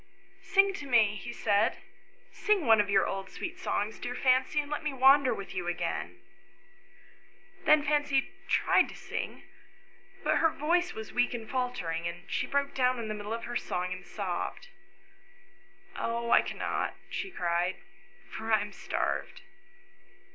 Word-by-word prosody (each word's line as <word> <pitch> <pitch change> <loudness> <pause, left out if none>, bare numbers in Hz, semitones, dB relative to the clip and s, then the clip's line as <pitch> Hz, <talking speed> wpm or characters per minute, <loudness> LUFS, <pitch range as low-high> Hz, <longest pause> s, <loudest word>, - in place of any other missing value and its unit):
" - - -30
Sing 395 0 +6
to 290 - -7
me," 220 -5 +4
he 185 - -6
said; 210 +2 +2 0.3
" - - -32 0.2
sing 410 -7 +4
one 225 -2 +6
of 205 - -4
your 200 +2 +4
old 195 0 -4
sweet 370 +1 -6
songs, 215 - -2
dear 245 - -4
Fancy, 260 +3 +3
and 290 0 -3
let 300 - -2
me 305 -2 -2
wander 270 0 +6
with 200 - -5
you 180 -2 -3
again." 175 -1 -3 1.5
Then 305 -1 +6
Fancy 290 -1 +1 0.2
tried - - +3
to - - -10
sing, - - -5 0.8
but - - +2
her 325 - +4
voice 345 +4 0
was 220 -2 -7
weak 245 0 +2
and 225 -2 -6
faltering, 195 -11 -2
and 170 +1 -6
she - - 0
broke 280 0 0
down 255 -1 +2
in 225 -2 -4
the - - -1
middle 210 0 -6
of 230 0 -3
her 240 - -5
song 180 -4 -2
and 185 0 -9
sobbed. 195 - -4 0.7
" 390 0 -29
Oh, 235 0 -2
I - - +7
cannot, - - -5
I - - -1
cannot," - - -1 0.2
she 385 0 -3
cried, 175 - 0 0.3
" 390 0 -26
for 220 0 -4
I 215 - +5
am 205 0 -5
starved." 380 - -3
245 Hz, 175 wpm, -30 LUFS, 205-300 Hz, 1.5 s, I